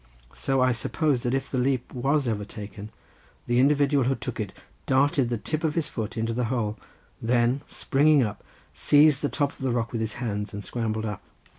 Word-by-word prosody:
So 135 -1 0
I 130 0 +4
supposed 135 +2 0
that 120 - +1
if 135 0 -3
the 130 - 0
leap 130 -1 0
was 135 +2 +1
ever 105 -3 -1
taken, 105 0 -8 0.6
the 120 0 +2
individual 140 0 +3
who 135 +2 +2
took 125 - -6
it 105 -3 -3 0.4
darted 135 -1 +3
the 120 - -1
tip 155 - -3
of 155 -2 0
his 165 -3 0
foot 110 0 -4
into 115 +1 -1
the 125 +1 0
hole, 110 -3 -1 0.5
then 120 +3 +2
springing 145 0 +3
up 105 -3 -4 0.3
seized 145 -1 +5
the 145 - 0
top 145 -2 0
of - - -21
the 135 - -1
rock 120 -1 -1
with 115 - -2
his 110 -1 -2
hands, 105 -4 -4
and 105 - -5
scrambled 110 -2 -2
up. 105 -3 -4
125 Hz, 200 wpm, -26 LUFS, 110-140 Hz, 0.6 s, seized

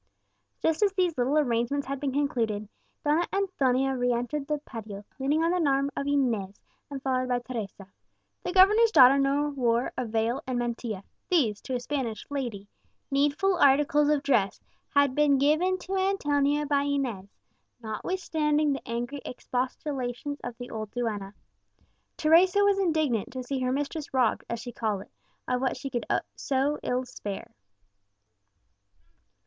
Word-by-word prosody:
Just 325 +2 +1
as 410 -2 +4
these 365 -4 +1
little 260 +4 +1
arrangements 260 0 +1
had 275 0 -4
been 280 -1 -1
concluded, 230 -7 -1 0.4
Donna 310 +4 +2
Antonia 270 -9 +1
re 245 -1 +1
entered 245 +4 -2
the 300 - 0
patio, 215 -8 -9
leaning 290 +4 +1
on 335 - +2
the 290 - +3
arm 275 +1 +1
of 280 - -3
Inez, 230 -9 0 0.3
and 275 -2 -6
followed 255 -1 0
by 250 - +2
Teresa. 225 -6 -6 0.6
The - - -3
governor's 415 +5 +6
daughter 275 - +7
now 280 +2 +2
wore 245 -4 0
a 250 - -2
veil 225 +4 0
and 255 -1 -1
mantilla; 235 -4 -3 0.3
these, 240 - +2
to 260 - -4
a - - 0
Spanish 245 -4 -3
lady, 235 -8 -4 0.4
needful 290 +7 +2
articles 290 0 +4
of 295 -2 +2
dress, 215 -9 +1 0.3
had 285 -2 +3
been 290 0 +4
given 310 +7 +2
to 380 +1 -5
Antonia 295 -7 +1
by 285 -1 +2
Inez, 270 -9 -2 0.5
notwithstanding 300 - 0
the 275 - -6
angry 240 +4 -3
expostulations 255 +2 -4
of 245 -1 -6
the 245 0 -8
old 215 -1 -5
duenna. 210 -4 -3 0.8
Teresa 360 +6 +5
was 400 -1 +3
indignant 310 - +1
to 255 -1 -4
see 265 +2 -3
her 255 0 0
mistress 290 +3 -3
robbed, 250 -4 +2
as 235 - -3
she 245 +2 -7
called 215 -4 -2
it, - - -25 0.4
of 250 0 0
what 265 - 0
she 275 -1 -6 0.4
so 280 +2 0
ill 250 +1 0
could 255 - -9
spare. 205 -4 -7
275 Hz, 155 wpm, -27 LUFS, 240-295 Hz, 0.8 s, daughter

